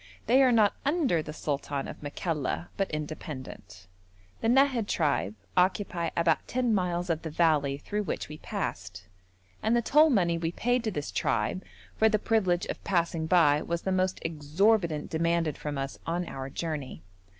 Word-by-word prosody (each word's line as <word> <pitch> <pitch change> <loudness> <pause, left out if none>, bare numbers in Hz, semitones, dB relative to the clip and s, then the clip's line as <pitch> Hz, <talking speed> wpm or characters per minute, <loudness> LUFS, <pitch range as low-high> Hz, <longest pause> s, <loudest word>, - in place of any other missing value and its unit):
They 255 +4 +5
are 260 -2 +5
not 215 -3 +4
under 285 - +2
the 150 - -7
sultan 145 -2 -3
of - - -9
Makalla, 150 +2 -3
but 195 -2 -1
independent. 150 - -7 0.5
The - - -1
Nahad 255 -3 +3
tribe 140 - 0 0.2
occupy 180 -2 +1
about 165 -1 +2
ten 245 -2 +1
miles 180 -2 0
of 160 - -1
the 160 - -5
valley 150 -4 +2
through 210 +8 -3
which 195 - -3
we 150 0 -9
passed, 95 - -5 0.6
and 225 +2 +2
the 240 - +3
toll 305 +6 +5
money 175 - +2
we 165 0 -2
paid 245 +3 0
to 220 - 0
this 145 -6 -4
tribe 115 - -1 0.3
for 220 - +4
the 215 - +2
privilege 190 -5 +1
of - - -6
passing 170 -3 0
by 155 -4 +4
was 170 0 -3
the 190 - -1
most 185 0 +1
exorbitant 165 +2 +1
demanded 165 -1 +1
from 150 -1 -5
us 135 0 -4
on 170 +1 -1
our 135 0 -6
journey. 145 - -5
170 Hz, 170 wpm, -28 LUFS, 150-205 Hz, 0.6 s, They